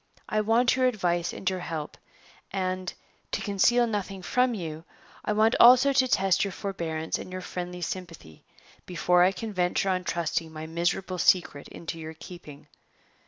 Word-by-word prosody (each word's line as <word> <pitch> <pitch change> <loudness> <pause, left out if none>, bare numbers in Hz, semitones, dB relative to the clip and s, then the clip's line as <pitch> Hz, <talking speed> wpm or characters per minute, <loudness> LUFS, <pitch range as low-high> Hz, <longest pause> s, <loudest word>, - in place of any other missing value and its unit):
I 215 - +1
want 230 +4 +3
your 255 -1 +3
advice 175 -7 0
and 195 - -8
your 185 0 +1
help; 160 -4 -5 0.5
and, 185 -1 -2 0.4
to - - 0
conceal 240 +4 +3
nothing 195 -4 -4
from 250 +4 +1
you, 160 -4 -6 0.4
I - - -1
want 220 +2 +3
also 255 +3 +8
to 260 -1 +3
test 195 -5 +2
your 200 - -2
forbearance 165 -5 -3
and - - -8
your 185 0 -5
friendly 180 0 -6
sympathy, 165 - -7 0.4
before 180 0 +2
I 180 +2 +5
can 215 +2 -6
venture 180 +1 0
on 185 -1 0
thrusting 170 -1 -2
my 155 0 -7
miserable 175 +3 -2
secret 170 -7 +2
into 165 0 -7
your 160 0 -7
keeping. 155 -4 -12
185 Hz, 165 wpm, -27 LUFS, 170-210 Hz, 0.5 s, also